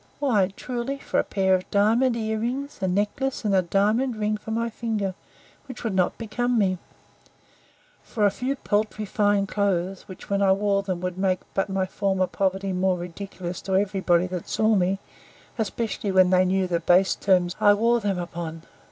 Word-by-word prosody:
Why, 210 -9 +2
truly, 255 +2 -4
for - - -1
a - - +2
pair 190 -1 +1
of 185 0 0
diamond 230 +5 +3
ear 220 -1 -2
rings, 265 +5 -3
a 190 - +1
necklace, 210 +8 -1
and 205 - +1
a 190 - +5
diamond 215 +8 +1
ring 215 0 0
for 215 +1 -9
my 230 +1 0
finger; 220 -4 -2 0.5
which 255 -2 -9
would 225 -4 -1
not 185 -1 +1
become 240 +2 -1
me: 185 -4 +1 1.2
For 215 -3 -1
a 200 - +4
few 260 +6 -2
paltry 215 -3 -1
fine 205 0 +2
clothes, 195 -2 -1
which, 185 - -11
when 200 0 0
I 195 -1 +5
wore 200 0 +1
them, 185 -3 -4
would 180 0 -4
make 185 -1 +1
but 195 - 0
my 190 -1 0
former 190 -1 0
poverty 190 +1 -1
more 185 0 +1
ridiculous 175 0 -6
to 190 - -2
every 195 0 +1
body 175 -1 +3
that 180 -2 -5
saw 220 0 +2
me; 190 -1 +2 0.6
especially 215 -1 -2
when 185 -1 +5
they 185 0 +4
knew 190 +1 +1
the 175 -2 0
base 180 +3 +4
terms 180 -2 +1
I 205 -1 +6
wore 235 +3 +2
them 200 -3 -1
upon. 170 -2 -6
200 Hz, 185 wpm, -25 LUFS, 185-220 Hz, 1.2 s, I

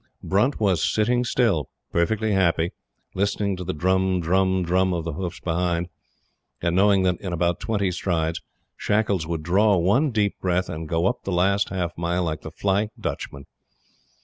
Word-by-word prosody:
Brunt 110 +9 +1
was 95 -5 +2
sitting 120 +3 +2
still, 115 - +1 0.2
perfectly 110 +6 +1
happy, 85 -3 +2 0.4
listening 100 0 0
to 90 - -5
the 90 - -2
"drum, 95 +3 +1
drum, 95 +2 +1
drum" 90 +1 +1
of 85 - -2
the 85 - -3
hoofs 90 +1 -5
behind, 85 0 -1 0.7
and 85 0 0
knowing 100 0 +4
that, 90 -1 0
in 95 - -4
about 85 0 0
twenty 100 -4 -1
strides, 85 -2 -1 0.3
Shackles 100 -6 0
would 80 -2 -3
draw 100 +4 +3
one 105 - +3
deep 105 -4 0
breath 90 0 0
and 80 0 -6
go 85 +1 +1
up - - 0
the 95 - -3
last 95 +3 +2
half 90 -3 -3
mile 85 +1 0
like 80 -2 -3
the - - -7
"Flying 100 +2 0
Dutchman." 70 0 -5
95 Hz, 170 wpm, -24 LUFS, 85-100 Hz, 0.7 s, knowing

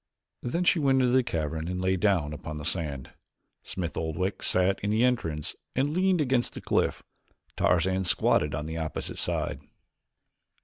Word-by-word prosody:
Then 170 +9 -1
she 175 -1 +4
went 135 -3 +3
into 125 -1 +3
the 130 - +6
cavern 80 -6 -3
and 90 0 -3
lay 95 +1 +1
down 90 -6 +1
upon 75 +1 -6
the 75 - -6
sand. 75 -6 -1 0.5
Smith 90 -3 -5
Oldwick 80 +5 -2
sat 95 +1 +2
in 100 - -2
the 110 +3 +2
entrance 80 -12 0 0.2
and 140 +3 +1
leaned 185 0 +2
against 130 -3 +1
the - - -5
cliff. - - 0 0.5
Tarzan 95 +2 +2
squatted 75 -3 +2
on 75 -1 -3
the 80 +1 -4
opposite 80 -2 -4
side. - - -2
95 Hz, 165 wpm, -28 LUFS, 80-125 Hz, 0.5 s, the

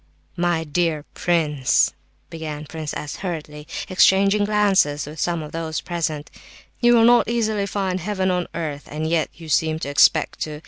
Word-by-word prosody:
"My 175 -2 0
dear 155 -1 -1
prince," 150 -7 +1 0.4
began 155 -2 -6
Prince 155 0 -6
S., 150 - -5
hurriedly, 155 -5 -6 0.2
exchanging 195 +2 +4
glances 195 -9 +2
with 150 +1 -9
some 170 -2 -1
of 150 - -9
those 160 -1 -3
present, 155 -4 -3 0.5
"you 240 0 +5
will 225 -1 +5
not 240 -1 +5
easily 220 -4 0
find 190 -2 -2
heaven 190 0 -1
on 180 -1 -1
earth, 150 -4 -4
and 155 +2 -4
yet 160 -1 +1
you 165 -1 -11
seem 155 0 +1
to 150 - -5
expect 150 +2 +3
to. 150 -1 -4
165 Hz, 165 wpm, -22 LUFS, 150-190 Hz, 0.5 s, you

